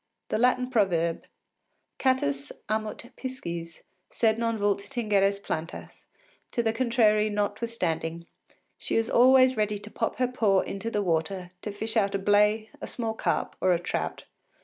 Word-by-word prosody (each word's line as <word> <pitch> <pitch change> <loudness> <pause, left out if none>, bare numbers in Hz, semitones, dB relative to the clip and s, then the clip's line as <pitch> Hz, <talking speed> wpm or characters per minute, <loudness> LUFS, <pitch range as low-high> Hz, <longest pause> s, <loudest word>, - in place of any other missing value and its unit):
The - - 0
Latin 250 +1 +2
proverb, 170 -7 +1 0.7
Catus 140 - 0 0.2
amat 215 +3 -3
pisces, 170 -11 -6 0.3
sed 225 -1 +1
non 230 -1 0
vult 205 -1 +1
tingere 205 -3 +1
plantas, 160 +2 -6 0.4
to 235 - 0
the 225 -1 +1
contrary 225 -3 +3
notwithstanding, 205 -6 -2 0.5
she - - -2
is 225 0 +1
always 260 +1 +6
ready 210 -1 0
to 210 +1 -11
pop - - -2
her 255 - +1
paw 215 -6 +2
into 200 +3 -4
the 210 -2 -1
water 175 +1 -1
to 210 - -4
fish 220 +3 -4
out 200 -3 +2
a - - +3
blay, 210 +2 +2
a - - -5
small 225 -2 -3
carp, - - -1
or 185 -1 +4
a 170 - +1
trout. 175 - -3
210 Hz, 150 wpm, -27 LUFS, 195-230 Hz, 0.7 s, always